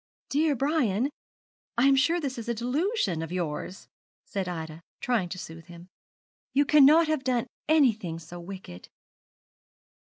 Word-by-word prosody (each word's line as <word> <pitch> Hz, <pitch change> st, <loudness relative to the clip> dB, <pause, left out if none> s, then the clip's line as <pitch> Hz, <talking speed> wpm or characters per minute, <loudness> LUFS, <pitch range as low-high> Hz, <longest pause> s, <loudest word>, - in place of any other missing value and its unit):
'Dear 295 Hz, +1 st, +2 dB
Brian, 270 Hz, -3 st, +1 dB, 0.7 s
I 240 Hz, -, +4 dB
am 275 Hz, 0 st, +6 dB
sure 330 Hz, +6 st, +3 dB
this 270 Hz, -6 st, -4 dB
is 230 Hz, -, -6 dB
a 235 Hz, -, 0 dB
delusion 250 Hz, -, 0 dB
of 165 Hz, 0 st, -5 dB
yours,' 180 Hz, +1 st, -4 dB, 0.4 s
said 195 Hz, -3 st, -3 dB
Ida, 160 Hz, -2 st, -6 dB, 0.2 s
trying 225 Hz, -8 st, 0 dB
to 185 Hz, -, -6 dB
soothe 165 Hz, -2 st, -9 dB
him; 175 Hz, +1 st, -13 dB, 0.7 s
'you 285 Hz, +1 st, +4 dB
cannot 300 Hz, +3 st, +6 dB
have 310 Hz, -3 st, 0 dB
done 250 Hz, -3 st, +1 dB, 0.2 s
anything 225 Hz, -, +3 dB
so 170 Hz, +2 st, -10 dB
wicked.' 175 Hz, -, -10 dB
235 Hz, 140 wpm, -27 LUFS, 175-285 Hz, 0.7 s, am